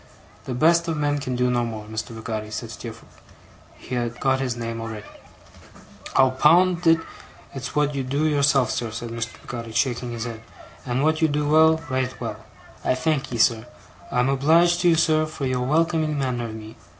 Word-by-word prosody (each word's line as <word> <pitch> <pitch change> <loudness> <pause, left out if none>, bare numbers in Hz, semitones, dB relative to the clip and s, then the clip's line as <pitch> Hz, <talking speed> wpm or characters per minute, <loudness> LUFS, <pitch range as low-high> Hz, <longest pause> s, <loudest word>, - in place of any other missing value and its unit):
'The 125 - -4
best 170 +5 +3
of 165 -2 -1
men 145 -1 0
can 130 -2 -3
do 125 0 +1
no 120 -1 +1
more, 110 -2 -5
Mr. 110 +1 -5
Peggotty,' 110 -1 -5
said 110 +2 -5
Steerforth. 115 -1 -10 0.6
He 125 - -9
had 120 -1 -2
got 135 -1 +2
his 130 -3 -2
name 115 -1 -4
already. 110 -2 -6 1.1
'I'll 130 -1 +5
pound 170 +6 +4
it, 165 0 +7 0.6
it's 130 -2 -6
wot 150 0 +2
you 140 - -2
do 140 +4 -1
yourself, 140 -4 +3
sir,' 120 - -2
said 115 +1 -6
Mr. 115 0 -4
Peggotty, 115 -2 -7
shaking 120 0 0
his 115 -1 -4
head, 115 -2 -6 0.5
'and 125 +2 0
wot 155 +1 +2
you 160 - +5
do 145 0 -1
well 160 +1 +5
right 130 -1 -2
well! - - -4 0.5
I - - +2
thankee, 135 -4 -1
sir. 115 +1 +2 0.4
I'm 125 +1 +2
obleeged 165 +6 +4
to 175 -1 +4
you, 165 - +5
sir, 155 -1 +2
for 155 -3 -5
your 130 -1 0
welcoming 155 +2 +1
manner 125 -3 -1
of 110 -1 -6
me. 110 0 -10
130 Hz, 190 wpm, -23 LUFS, 115-155 Hz, 1.1 s, it